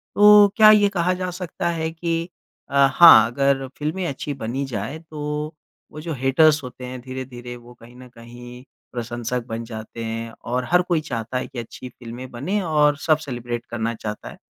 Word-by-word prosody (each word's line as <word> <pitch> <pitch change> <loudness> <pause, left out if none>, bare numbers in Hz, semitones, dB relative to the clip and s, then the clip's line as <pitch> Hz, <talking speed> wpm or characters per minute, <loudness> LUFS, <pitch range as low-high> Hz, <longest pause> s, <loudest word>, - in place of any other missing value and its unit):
तो 210 0 +8
क्या 215 -1 +9
ये 205 -1 +5
कहा 175 +2 +2
जा 185 - -2
सकता 175 -1 -4
है 160 -1 -2
कि 170 +1 -4 0.6
हाँ, 140 -2 +7
अगर 135 +2 0
फ़िल्में 160 +5 -2
अच्छी 145 +1 -4
बनी 130 +1 -4
जाए, 135 +5 -5
तो 150 -1 -5 0.4
वो 155 - -9
जो 165 0 -4
हेटर्स 145 +4 +3
होते 125 0 -9
हैं 125 0 -7
धीरे-धीरे 125 -1 -8
वो 120 0 -14
कहीं 120 0 -17
ना 125 0 -13
कहीं 120 +1 -12 0.3
प्रशंसक 120 0 -4
बन 115 0 -4
जाते 110 0 -8
हैं, 115 0 -5
और 125 +2 -2
हर 180 0 +5
कोई 175 -3 0
चाहता 120 -4 -4
है 125 - -3
कि 125 - -8
अच्छी 120 +2 -9
फिल्में 125 +1 -10
बने 165 +13 -2
और 150 -4 +2
सब 155 -2 +5
सेलिब्रेट 120 -2 -5
करना 115 0 -3
चाहता 105 -1 -6
है। - - -12
130 Hz, 180 wpm, -22 LUFS, 120-155 Hz, 0.6 s, क्या